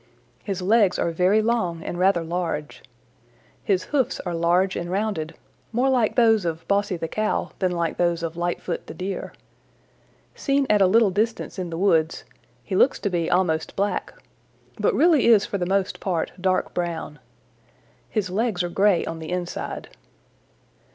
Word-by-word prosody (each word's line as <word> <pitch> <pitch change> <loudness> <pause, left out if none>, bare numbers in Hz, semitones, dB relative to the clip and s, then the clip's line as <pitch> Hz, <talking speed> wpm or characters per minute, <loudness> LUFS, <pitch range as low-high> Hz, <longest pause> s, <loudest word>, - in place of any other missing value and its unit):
His 195 -3 -3
legs 205 -1 +3
are 170 - 0
very 185 +6 +3
long 185 -8 0
and 175 - -5
rather 185 -2 +3
large. 165 -3 -3 0.8
His 190 -3 +1
hoofs 275 -5 0
are 175 - -4
large 175 +3 +2
and 175 - -4
rounded, 185 -5 -2 0.4
more 250 +4 +2
like 240 -4 +2
those 225 -4 +4
of 165 -1 -4
Bossy 200 -2 +1
the 165 - -3
Cow 215 +5 -1
than 185 -2 +1
like 170 -2 -2
those 170 -1 +1
of 165 0 -3
Lightfoot 175 +1 -3
the - - -8
Deer. 190 +1 -4 1.0
Seen 275 0 +1
at 210 -1 +4
a 190 - +6
little 215 +1 +4
distance 215 +1 -2
in 180 -2 -3
the 165 - -5
woods, 165 -4 +2 0.4
he 190 - -4
looks 265 - +4
to 200 - -2
be 170 -2 0
almost 165 -3 0
black, 200 +1 -1 0.7
but - - +2
really 320 -7 +4
is 220 -3 +6
for 200 - -3
the 175 - -1
most 195 0 0
part 175 -4 -2
dark 185 0 0
brown. 165 -4 -4 0.9
His 200 -5 -2
legs 205 -2 0
are 175 - -2
gray 195 -1 +2
on 165 - -5
the 160 - -7
inside. 180 -1 -4
185 Hz, 165 wpm, -24 LUFS, 170-210 Hz, 1.0 s, a